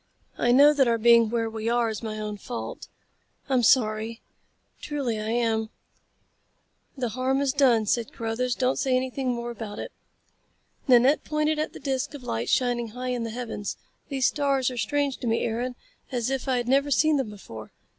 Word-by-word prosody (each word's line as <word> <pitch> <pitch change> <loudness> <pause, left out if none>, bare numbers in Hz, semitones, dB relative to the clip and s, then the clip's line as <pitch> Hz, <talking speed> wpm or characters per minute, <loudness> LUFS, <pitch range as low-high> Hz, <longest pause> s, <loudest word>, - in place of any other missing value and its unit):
I 240 - +2
know 285 +4 +7
that 275 -3 +3
our 230 -1 +2
being 230 0 +5
where 230 0 0
we 220 0 -3
are 240 0 +2
is 220 -1 -4
my 215 -2 -5
own 210 -1 -4
fault. 240 +4 -6 0.6
I'm 260 -3 +2
sorry. 225 -1 +2 0.6
Truly 270 -7 -2
I 215 +1 -3
am." 225 -2 0 1.3
"The 250 -3 -1
harm 260 +3 0
is 280 -2 +1
done," 250 -6 +4
said 230 +2 0
Carruthers. 235 +2 -2
"Don't 255 0 0
say 260 -2 +1
anything 260 0 -2
more 240 0 -4
about 215 -2 -7
it." - - -6 1.0
Nanette 255 +3 +5
pointed 305 0 0
at 310 - -2
the - - -9
disc 270 +1 -2
of 275 - -9
light 115 - -3
shining 245 -2 +1
high 250 +3 -5
in 245 -2 -2
the - - -4
heavens. 225 -3 -5 0.3
"These 270 -3 0
stars 275 -3 +1
are - - -6
as 245 - -2
strange 285 -2 0
to 245 - -5
me, 225 0 +1
Aaron, 245 +2 -2 0.4
as 245 0 -1
if 270 0 -2
I 260 -1 +2
had 240 -1 -2
never 275 +3 +3
seen 305 +2 +3
them 265 -5 -2
before. 115 - -10
245 Hz, 190 wpm, -26 LUFS, 225-270 Hz, 1.3 s, know